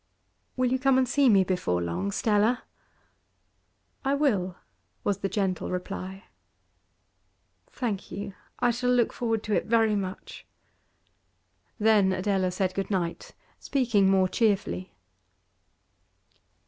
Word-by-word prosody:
'Will 255 Hz, -1 st, +1 dB
you 260 Hz, -, +1 dB
come 270 Hz, 0 st, +3 dB
and 260 Hz, -1 st, +3 dB
see 275 Hz, +1 st, +3 dB
me 195 Hz, -3 st, +5 dB
before 180 Hz, -, -1 dB
long, 85 Hz, +3 st, -2 dB
Stella?' 215 Hz, -, +1 dB, 1.4 s
'I 275 Hz, 0 st, +1 dB
will,' 205 Hz, -11 st, +1 dB, 0.5 s
was 200 Hz, -1 st, 0 dB
the 195 Hz, -, -2 dB
gentle 190 Hz, -3 st, -1 dB
reply. 190 Hz, +1 st, -5 dB, 1.4 s
'Thank 220 Hz, -7 st, -4 dB
you. 200 Hz, 0 st, -5 dB, 0.2 s
I 245 Hz, -1 st, +2 dB
shall 245 Hz, +1 st, -1 dB
look 245 Hz, -2 st, +3 dB
forward 225 Hz, -2 st, -1 dB
to 215 Hz, -, -2 dB
it -, -, 0 dB
very 225 Hz, -2 st, +3 dB
much.' 195 Hz, -1 st, -6 dB, 1.3 s
Then 210 Hz, -3 st, +4 dB
Adela 185 Hz, 0 st, 0 dB
said 185 Hz, 0 st, -1 dB
good 195 Hz, -1 st, -3 dB
night, 170 Hz, -4 st, -3 dB, 0.2 s
speaking 230 Hz, -8 st, +2 dB
more 190 Hz, -1 st, +4 dB
cheerfully. 200 Hz, -2 st, 0 dB
200 Hz, 120 wpm, -27 LUFS, 185-235 Hz, 1.4 s, me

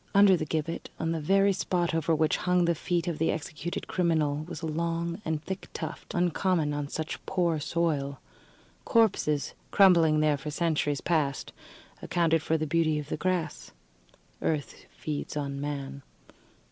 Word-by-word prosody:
Under 200 Hz, -1 st, +7 dB
the 155 Hz, -3 st, -3 dB
gibbet, 160 Hz, +2 st, -3 dB
on 165 Hz, 0 st, 0 dB
the 165 Hz, -, -1 dB
very 195 Hz, +5 st, +4 dB
spot 175 Hz, -2 st, 0 dB
over 165 Hz, 0 st, +1 dB
which 155 Hz, 0 st, +2 dB
hung 180 Hz, -1 st, +2 dB
the 170 Hz, -, +3 dB
feet 170 Hz, +1 st, -1 dB
of 170 Hz, -3 st, -2 dB
the 160 Hz, -, +2 dB
executed 160 Hz, +2 st, -4 dB
criminal, 160 Hz, -5 st, +1 dB
was 170 Hz, -, -7 dB
a -, -, 0 dB
long 170 Hz, +3 st, -2 dB
and 155 Hz, -1 st, -2 dB
thick 190 Hz, 0 st, -5 dB
tuft, 160 Hz, -1 st, -6 dB
uncommon 175 Hz, -3 st, +1 dB
on 145 Hz, -1 st, -2 dB
such 160 Hz, +2 st, -5 dB
poor 170 Hz, -4 st, +1 dB
soil. 150 Hz, -3 st, -1 dB, 0.6 s
Corpses, 190 Hz, -, +2 dB, 0.2 s
crumbling 170 Hz, -6 st, +5 dB
there 150 Hz, -1 st, +3 dB
for 145 Hz, +2 st, -6 dB
centuries 150 Hz, -3 st, 0 dB
past, 150 Hz, -5 st, 0 dB, 0.5 s
accounted 165 Hz, -2 st, +2 dB
for 160 Hz, +1 st, +1 dB
the 155 Hz, -, -1 dB
beauty 155 Hz, 0 st, +2 dB
of 150 Hz, 0 st, -5 dB
the -, -, -1 dB
grass. 180 Hz, 0 st, -2 dB, 0.7 s
Earth 150 Hz, -3 st, -2 dB
feeds 150 Hz, -1 st, -5 dB
on 140 Hz, -1 st, -3 dB
man. 140 Hz, -1 st, -4 dB
160 Hz, 160 wpm, -28 LUFS, 150-175 Hz, 0.7 s, Under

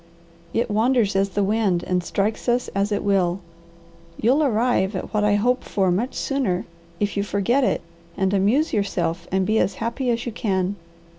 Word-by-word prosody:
It 225 Hz, +2 st, -1 dB
wanders 220 Hz, -1 st, +2 dB
as 195 Hz, +1 st, +2 dB
the 205 Hz, +1 st, 0 dB
wind, 195 Hz, -4 st, +1 dB
and 180 Hz, -1 st, -1 dB
strikes 210 Hz, +7 st, -1 dB
us 245 Hz, +1 st, +1 dB
as 200 Hz, +1 st, -1 dB
it 205 Hz, -, 0 dB
will. 190 Hz, -2 st, +1 dB, 0.8 s
You'll 255 Hz, +7 st, +3 dB
arrive 225 Hz, -6 st, +1 dB
at 185 Hz, -, -5 dB
what 210 Hz, -1 st, +1 dB
I 210 Hz, 0 st, +3 dB
hope 245 Hz, +5 st, +1 dB
for 190 Hz, -3 st, 0 dB
much 225 Hz, +9 st, -1 dB
sooner 255 Hz, -11 st, -1 dB, 0.3 s
if 205 Hz, -1 st, -1 dB
you 200 Hz, -, +1 dB
forget 205 Hz, +7 st, +1 dB
it -, -, +1 dB, 0.4 s
and 190 Hz, 0 st, +1 dB
amuse 215 Hz, +11 st, +2 dB
yourself 175 Hz, -4 st, -1 dB
and 190 Hz, 0 st, +1 dB
be 220 Hz, +2 st, +2 dB
as 190 Hz, -, +1 dB
happy 235 Hz, +4 st, -2 dB
as 235 Hz, 0 st, 0 dB
you 240 Hz, -, -3 dB
can. 195 Hz, -4 st, -1 dB
205 Hz, 180 wpm, -23 LUFS, 190-235 Hz, 0.8 s, You'll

